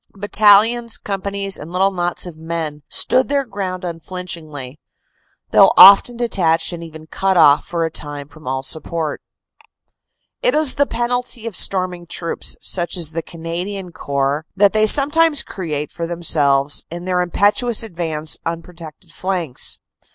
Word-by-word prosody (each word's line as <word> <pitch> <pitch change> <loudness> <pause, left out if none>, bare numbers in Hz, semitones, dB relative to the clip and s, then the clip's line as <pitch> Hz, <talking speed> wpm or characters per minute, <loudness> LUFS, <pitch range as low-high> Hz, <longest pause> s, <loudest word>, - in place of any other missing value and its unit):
Battalions, 215 +3 +3
companies 195 0 -3
and 155 +3 -9
little 190 +2 +1
knots 175 -1 -2
of 165 -3 -10
men 160 -2 -5
stood 255 +1 +2
their 280 -1 0
ground 195 -4 -5
unflinch 180 +1 -5
ingly, 145 -5 -10 0.7
though - - +6
often 200 +4 +8
detached 175 -9 0
and 170 -1 -7
even 160 -1 -11
cut 190 +3 -1
off 145 -3 +5
for 170 -1 -2
a 160 - -4
time 145 -2 -6
from 155 -2 -15
all 130 0 -2
support. 160 +2 -2 1.2
It - - +2
is 305 -3 +4
the 285 0 +1
penalty 240 0 -3
of 230 -4 -5
storming 180 -2 0
troops, 170 0 -2
such 175 -1 -2
as 165 -3 0
the 165 +1 -3
Canadian 175 +3 -6
Corps, 140 +1 -2
that 200 +1 +4
they 215 0 +3
sometimes 295 +4 +4
create 150 -6 -5
for 170 -1 -5
themselves, 145 -5 +1
in 175 +1 -8
their 180 -1 0
impetuous 205 +7 +1
advance, 165 -6 -3
unprotected 165 0 -8
flanks. 175 -8 -1
175 Hz, 145 wpm, -18 LUFS, 160-200 Hz, 1.2 s, often